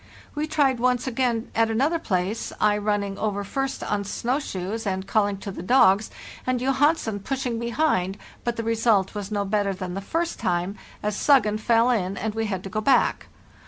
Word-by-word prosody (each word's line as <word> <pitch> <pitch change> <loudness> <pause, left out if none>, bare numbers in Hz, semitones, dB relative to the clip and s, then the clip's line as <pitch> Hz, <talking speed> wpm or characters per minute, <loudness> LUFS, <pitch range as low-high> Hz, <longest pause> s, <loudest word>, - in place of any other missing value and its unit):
We 300 0 -2
tried 280 -5 +2
once 250 0 +1
again 245 -2 -1
at 225 0 +2
another 280 +9 +1
place, 190 - -2
I 210 -1 +4
running 205 -1 -1
over 205 -2 -1
first 270 +6 -3
on 205 -1 -1
snow 245 +6 -1
shoes 210 -2 -4
and 190 0 -2
calling 205 -1 +1
to 200 +1 -6
the 185 - -7
dogs, 200 -1 +4 0.4
and 255 -1 +1
Johansen 270 -4 +1
pushing 250 +1 -2
behind, 235 - 0 0.3
but 240 -1 -1
the 230 - -3
result 225 -4 +2
was 205 -2 -5
no 205 -2 -1
better 200 -1 0
than 185 -1 -5
the 195 - -4
first 330 - -2
time, 180 +2 -1 0.3
as 210 -1 -1
'Suggen' 215 -7 +3
fell 230 +2 +3
in, 195 -4 -1
and 215 +2 -2
we 225 0 -1
had 190 -3 -3
to 195 - -6
go 215 - -1
back. 255 +2 +2
220 Hz, 190 wpm, -24 LUFS, 200-250 Hz, 0.4 s, I